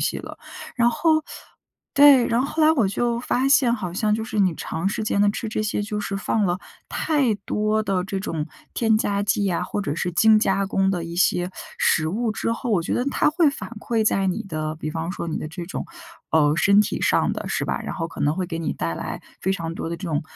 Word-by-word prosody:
西 - - 0
了。 - - -9 0.4
然 240 -1 +3
后 315 +3 +2 0.7
对， 280 -4 +7
然 235 +2 +2
后 270 - 0
后 310 +2 -1
来 310 - +6
我 235 -10 +2
就 235 +3 0
发 255 +2 0
现 255 -4 +4
好 185 -6 -5
像 210 +2 +1
就 220 - -2
是 225 -3 -4
你 185 -4 +3
长 170 +5 -3
时 215 - -3
间 200 -1 0
的 205 - +5
吃 225 +1 -4
这 215 - -2
些， 210 -1 -1
就 210 0 -3
是 195 -1 -3
放 210 +2 0
了 175 -1 +1 0.3
太 280 -8 +1
多 215 +2 -1
的 190 -3 -1
这 195 0 -3
种 160 -6 -3 0.3
添 225 -2 +3
加 200 -2 0
剂 205 0 +1
呀 185 -3 0
或 205 - -3
者 145 - -2
是 175 0 -2
精 220 +3 +5
加 195 -2 +1
工 195 0 +1
的 175 -3 -2
一 170 0 -7
些 180 0 +2 0.3
食 155 -1 +2
物 225 +6 -1
之 230 - -1
后， 235 0 -4
我 195 - +3
觉 - - -2
得 245 - 0
它 280 - +2
会 310 0 +3
反 285 - -7
馈 225 -2 0
在 195 -2 +2
你 185 - -2
的， 155 -4 -4
比 155 - -5
方 165 +2 -3
说 170 - -5
你 160 - -2
的 155 - -4
这 170 +1 -7
种， 190 - -4 0.5
呃， 150 -2 +4
身 200 +4 +5
体 210 - -1
上 - - +2
的 - - -5
是 - - -1
吧？ - - -2
然 - - -5
后 165 -2 -3
可 - - -10
能 145 +2 +2
会 185 -1 -1
给 165 -1 -4
你 160 - -1
带 85 0 -3
来 - - -5 0.2
非 190 - 0
常 165 -3 -4
多 165 - -4
的 170 - -3
这 185 - -6
种 150 -2 -1
200 Hz, 265 characters per minute, -23 LUFS, 175-230 Hz, 0.7 s, 对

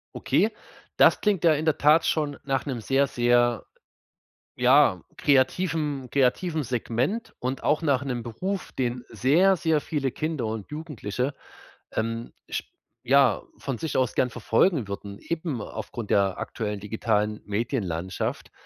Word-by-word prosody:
Okay, 220 +1 +1 0.4
das - - +5
klingt 205 -5 +1
ja 160 -2 +6
in 155 +2 -2
der 160 - +2
Tat 150 +3 +4
schon 150 -3 0
nach 135 0 -1
'nem 125 -4 -3
sehr, 135 +5 +2
sehr, 120 -1 +2 0.9
ja, 125 - +5
kreativen 145 -1 +1
kreativen 155 +5 +1
Segment 125 - -2
und 130 +2 -3
auch 150 +2 +2
nach 140 -3 +1
'nem 125 -3 -3
Beruf, 180 - -4
den 125 -1 -2
sehr, 155 - +4
sehr 160 -2 +1
viele 140 -4 -2
Kinder 155 -6 -2
und 110 -2 -5
Jugendliche, 140 -4 -4 0.6
ähm, 115 +1 -3 0.2
sch - - -2 0.4
ja, 135 -5 +4 0.2
von 135 -4 -4
sich 160 -4 -4
aus 130 -3 +1
gern 125 - +2
verfolgen 120 - +2
würden, 100 0 -6
eben 160 -6 -3
aufgrund 110 +1 -6
der 100 -1 +2
aktuellen 105 -3 -4
digitalen 105 0 -1
Medienlandschaft. 100 - -3
130 Hz, 140 wpm, -26 LUFS, 115-150 Hz, 0.9 s, ja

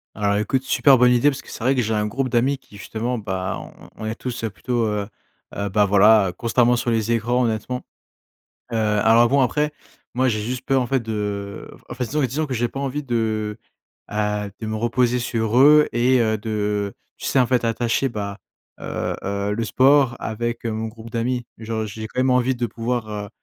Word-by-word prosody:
Alors 100 -1 +1
écoute, 115 +5 0
super 135 -1 +4
bonne 125 0 +6
idée 125 +4 +4
parce 135 - -7
que - - -16
c'est - - -7
vrai 130 +3 +3
que 130 - +1
j'ai 110 0 -1
un 105 0 0
groupe 130 +5 -2
d'amis 130 +3 +1
qui, 105 - -16
justement 115 +4 -3
bah, 95 -3 -3
on - - -13
on 110 - -7
est 110 - -2
tous, 120 0 -6
heu, 110 - -1
plutôt, 115 +7 -1
heu 105 -2 -2 0.5
heu, 100 0 -2
bah 105 +2 +3
voilà, 100 -1 +5
constamment 120 +1 +3
sur 120 0 -1
les 115 0 0
écrans 120 +2 +1
honnêtement. 115 +3 -2 0.9
Heu, - - -2
alors 110 +2 +4
bon 140 +3 +3
après, 150 +4 +1 0.4
moi 130 +1 +2
j'ai 110 -4 0
juste 125 +4 -4
peur 135 0 +2
en - - -3
fait 135 +2 +1
de 105 -3 -4 0.2
enfin 125 +1 -3
disons 150 +6 -1
disons 140 +4 0
que 135 - -4
j'ai 120 0 0
pas 135 - -7
envie 140 +1 -2
de, 110 -5 -1 0.5
heu, 105 -1 -1
de 110 - -3
me 110 - -2
reposer 120 +2 +1
sur 115 -1 -1
eux 150 +2 +7
et 125 +2 +3
heu, 110 -1 +1
de, 105 -2 -2 0.2
tu - - -8
sais, 135 - +2
en 125 - +4
fait 125 -1 +1
attacher 115 +3 0
bah, 100 -3 -5 0.4
heu - - -3
heu, 100 +1 -2
le 115 +2 -2
sport 130 +1 +4
avec, 120 +1 -3
heu, - - -1
mon 110 +1 -3
groupe 115 0 -11
d'amis. 120 +1 -1
Genre 110 -1 -3
j'ai 110 +2 -7
quand 125 - -5
même 130 +1 +3
envie 125 +1 +3
de 120 0 -1
pouvoir, 115 +1 -3
heu, 105 -1 -5
115 Hz, 215 wpm, -22 LUFS, 105-125 Hz, 0.9 s, eux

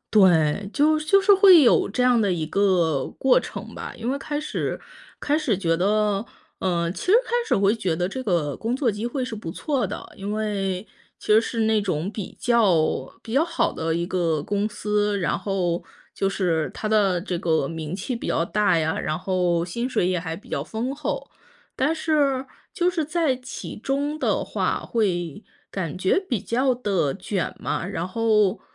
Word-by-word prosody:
对， 185 -2 +4
就 305 +1 +3
就 390 +6 +4
是 405 +1 +5
会 375 -5 +8
有 240 - +4
这 250 +5 -1
样 245 -2 +4
的 200 -3 +2
一 160 -3 -2
个 170 -8 +2
过 265 -1 +5
程 - - -8
吧。 - - -7
因 235 +3 -3
为 280 - -1
开 295 +1 -3
始 305 - -3 0.4
开 295 +2 +1
始 245 - 0
觉 165 -3 +1
得， 205 +2 +1 0.3
呃， 170 -2 0
其 - - -7
实 375 - +4
开 - - -10 0.2
始 - - +3
会 200 +2 +3
觉 185 -7 -1
得 180 +1 -1
这 260 +5 -5
个 170 - 0
工 230 +3 -2
作 260 -5 +1
机 210 +3 -4
会 255 +1 -2
是 230 - -5
不 205 -6 -6
错 275 - -1
的， - - -7
因 200 +1 -4
为 200 -3 -2 0.3
其 - - -13
实 220 - +7
是 230 0 -3
那 220 -1 +3
种 180 0 -2
比 210 -4 -7
较 210 -10 +4 0.4
比 225 - -8
较 285 +5 +4
好 335 -1 0
的 160 0 -2
一 170 +1 -1
个 165 -5 0
公 205 +3 -1
司。 210 -1 0
然 175 -1 0
后， 185 -3 -1 0.3
就 195 - 0
是 170 -5 0
它 215 - -3
的 200 -5 +3
这 180 -2 -3
个 160 -5 +1
名 160 0 -5
气 250 - -3
比 235 - -6
较 165 - +1
大 200 -2 +2
呀， 160 0 0
然 155 +1 -2
后， 180 -3 0
薪 235 +8 -3
水 180 - +1
也 180 -1 +1
还 165 -1 -5
比 - - -15
较 - - -1
丰 245 +5 -3
厚。 295 - -4 0.4
但 295 +5 +1
是 285 -5 +1 0.3
就 360 0 +2
是 330 -3 -1
在 315 -3 +1
其 255 +1 -8
中 285 +6 -2
的 - - 0
话 - - -1
会 180 -6 -1 0.3
感 175 -5 -4
觉 190 - +2
比 260 - -2
较 255 +2 +1
地 195 - 0
卷 195 -3 -3
嘛， 170 - -2
然 180 -3 -3
后 215 0 +2
205 Hz, 210 characters per minute, -24 LUFS, 175-250 Hz, 0.4 s, 会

